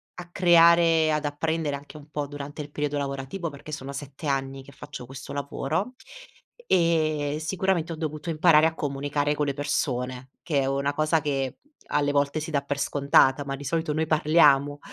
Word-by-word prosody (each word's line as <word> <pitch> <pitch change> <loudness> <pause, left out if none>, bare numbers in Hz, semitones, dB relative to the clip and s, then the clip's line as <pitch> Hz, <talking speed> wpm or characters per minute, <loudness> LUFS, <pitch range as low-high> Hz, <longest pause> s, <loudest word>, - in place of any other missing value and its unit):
a 175 -1 -9
creare 170 -1 +6 0.2
e - - +1
ad 150 -1 -1
apprendere 150 0 -1
anche 145 +2 -10
un 150 0 -14
po' 150 -1 -3
durante 145 +1 -7
il 145 - -12
periodo 150 0 -2
lavorativo, 140 +5 -4
perché 140 +2 -11
sono 140 -2 -6
7 140 +2 -8
anni 135 -1 -2
che 140 - -14
faccio 140 -2 -9
questo 130 +2 -9
lavoro, 145 - -3 0.7
e 155 - +1
sicuramente 175 0 -1
ho - - -5
dovuto 155 0 -5
imparare 155 -1 +5
a 160 - +2
comunicare 145 0 -1
con 150 - 0
le 140 - -1
persone, 130 -3 -2
che 145 -5 0
è - - 0
una 140 +1 0
cosa 155 +2 +1
che 135 -2 -2 0.3
alle 145 -1 +1
volte 140 +2 +1
si 155 +1 -6
dà 145 -2 +1
per 140 0 -4
scontata, 140 -1 +3
ma 135 0 -3
di 145 - -9
solito 160 +2 -1
noi 160 +1 -1
parliamo 150 -2 +4
145 Hz, 185 wpm, -26 LUFS, 140-155 Hz, 0.7 s, creare